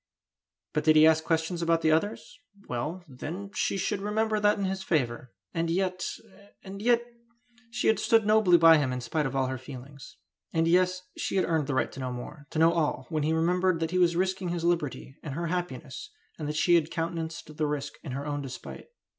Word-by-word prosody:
But 150 Hz, -, 0 dB
did 155 Hz, 0 st, +5 dB
he 155 Hz, 0 st, +8 dB
ask 160 Hz, 0 st, +4 dB
questions 165 Hz, +2 st, -1 dB
about 165 Hz, -1 st, +2 dB
the 160 Hz, -, +4 dB
others? 205 Hz, -, -1 dB, 0.3 s
Well, 150 Hz, +9 st, -4 dB
then, 170 Hz, +9 st, -7 dB
she 195 Hz, -, 0 dB
should 200 Hz, 0 st, -1 dB
remember 215 Hz, +1 st, 0 dB
that 210 Hz, 0 st, +3 dB
in 200 Hz, -, -1 dB
his 190 Hz, 0 st, -2 dB
favour. 130 Hz, -, -1 dB, 0.2 s
And 165 Hz, 0 st, -1 dB
yet 185 Hz, +1 st, -1 dB, 0.5 s
and 195 Hz, 0 st, -8 dB
yet 235 Hz, +1 st, +3 dB, 0.7 s
she 245 Hz, +1 st, -3 dB
had 220 Hz, -, +3 dB
stood 225 Hz, -2 st, +3 dB
nobly 210 Hz, -4 st, +5 dB
by 165 Hz, -1 st, +7 dB
him 135 Hz, -3 st, 0 dB
in 125 Hz, -, -2 dB
spite 150 Hz, +4 st, -1 dB
of 135 Hz, -, -6 dB
all 135 Hz, -1 st, +2 dB
her 130 Hz, 0 st, -3 dB
feelings! 135 Hz, +1 st, -11 dB, 0.4 s
And 165 Hz, 0 st, +2 dB
yes, 185 Hz, +1 st, +2 dB
she -, -, -3 dB
had 190 Hz, -, +3 dB
earned 160 Hz, -4 st, 0 dB
the 145 Hz, -, -1 dB
right -, -, +1 dB
to -, -, -10 dB
know 130 Hz, -1 st, -3 dB
more 125 Hz, +4 st, -8 dB
to -, -, -6 dB
know 165 Hz, +1 st, +5 dB
all 150 Hz, -5 st, 0 dB
when 155 Hz, -2 st, -1 dB
he 155 Hz, +2 st, +1 dB
remembered 175 Hz, +2 st, +2 dB
that 165 Hz, 0 st, -2 dB
he 185 Hz, -, +1 dB
was 175 Hz, -1 st, +4 dB
risking 185 Hz, 0 st, 0 dB
his 170 Hz, -1 st, -3 dB
liberty 155 Hz, -5 st, -1 dB
and 140 Hz, -3 st, -6 dB
her 170 Hz, +2 st, -2 dB
happiness, 180 Hz, -, -5 dB, 0.3 s
and 150 Hz, -, -3 dB
that 150 Hz, -, -3 dB
she 175 Hz, +3 st, +3 dB
had 165 Hz, -2 st, +4 dB
countenanced 165 Hz, -2 st, -4 dB
the 155 Hz, -, +1 dB
risk 145 Hz, -1 st, -3 dB
in 135 Hz, -, -6 dB
her 140 Hz, +2 st, -4 dB
own 145 Hz, -1 st, -2 dB
despite! 135 Hz, -2 st, -8 dB
165 Hz, 215 wpm, -28 LUFS, 150-185 Hz, 0.7 s, he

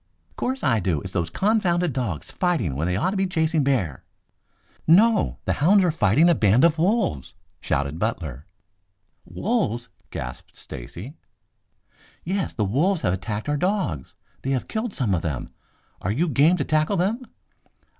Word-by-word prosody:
"'Course 260 Hz, +1 st, -2 dB
I 115 Hz, -, +3 dB
do. 85 Hz, -6 st, 0 dB
It's 95 Hz, 0 st, -8 dB
those 85 Hz, -3 st, -1 dB
confounded 180 Hz, -, +1 dB
dogs 110 Hz, -, -3 dB
fighting 165 Hz, -, 0 dB
when 75 Hz, +5 st, -1 dB
they 90 Hz, -, 0 dB
ought 180 Hz, -, +1 dB
to -, -, -3 dB
be 190 Hz, 0 st, +1 dB
chasing 160 Hz, -3 st, +1 dB
bear." 105 Hz, -, 0 dB, 0.8 s
"No! 210 Hz, +6 st, +4 dB
The -, -, +1 dB
hounds 190 Hz, +6 st, +5 dB
are 175 Hz, -, +3 dB
fighting 155 Hz, -, +3 dB
a 175 Hz, -, +6 dB
band 110 Hz, -1 st, +3 dB
of 165 Hz, -1 st, +4 dB
wolves!" 175 Hz, -, 0 dB, 0.2 s
shouted 70 Hz, +4 st, -2 dB
Butler. 80 Hz, -, -3 dB, 0.8 s
"Wolves?" 130 Hz, -, -1 dB, 0.2 s
gasped 60 Hz, 0 st, -7 dB
Stacy. 85 Hz, -, -8 dB, 1.1 s
"Yes. 190 Hz, +2 st, -1 dB
The 105 Hz, -, -1 dB
wolves 160 Hz, -, +1 dB
have 90 Hz, -, +2 dB
attacked 105 Hz, +4 st, -4 dB
our 145 Hz, 0 st, +1 dB
dogs. 180 Hz, -, -1 dB, 0.3 s
They 135 Hz, -, -3 dB
have 130 Hz, -2 st, -1 dB
killed 220 Hz, -1 st, -3 dB
some 115 Hz, -8 st, 0 dB
of 85 Hz, -, 0 dB
them. 75 Hz, -7 st, -4 dB, 0.5 s
Are 95 Hz, -, -1 dB
you 155 Hz, +11 st, +1 dB
game 155 Hz, +5 st, +4 dB
to -, -, 0 dB
tackle 155 Hz, +5 st, +1 dB
them?" 205 Hz, +8 st, 0 dB
140 Hz, 160 wpm, -24 LUFS, -, 1.1 s, a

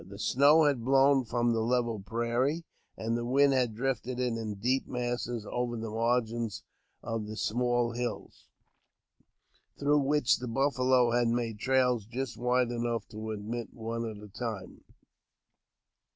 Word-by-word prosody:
The 100 Hz, +3 st, -11 dB
snow 145 Hz, +8 st, +5 dB
had 140 Hz, -6 st, +2 dB
blown 135 Hz, +1 st, +4 dB
from 120 Hz, +1 st, +1 dB
the 115 Hz, -, 0 dB
level 120 Hz, -1 st, 0 dB
prairie, 120 Hz, -, -1 dB, 0.3 s
and 115 Hz, +1 st, -1 dB
the 120 Hz, -, -2 dB
wind 135 Hz, +3 st, +4 dB
had 125 Hz, -4 st, +1 dB
drifted 125 Hz, 0 st, -2 dB
it 125 Hz, -2 st, 0 dB
in 110 Hz, -2 st, -4 dB
deep 125 Hz, +7 st, 0 dB
masses 120 Hz, -2 st, -3 dB
over 120 Hz, -1 st, -2 dB
the 110 Hz, -1 st, -5 dB
margins 115 Hz, -1 st, -1 dB, 0.4 s
of 115 Hz, -2 st, -3 dB
the 110 Hz, 0 st, -7 dB
small 120 Hz, +1 st, +1 dB
hills, 120 Hz, -3 st, -5 dB, 1.3 s
through 145 Hz, +1 st, +3 dB
which 140 Hz, -3 st, +2 dB
the 125 Hz, -, -5 dB
buffalo 130 Hz, -1 st, +2 dB
had 120 Hz, 0 st, +2 dB
made 115 Hz, -2 st, -1 dB
trails 125 Hz, -4 st, +2 dB
just 125 Hz, +1 st, -4 dB
wide 125 Hz, 0 st, +1 dB
enough 120 Hz, -2 st, -2 dB
to 110 Hz, 0 st, -6 dB
admit 110 Hz, +2 st, -5 dB
one 115 Hz, 0 st, -4 dB
at 110 Hz, -, -8 dB
a -, -, -9 dB
time. 105 Hz, -2 st, -6 dB
120 Hz, 150 wpm, -30 LUFS, 115-130 Hz, 1.3 s, snow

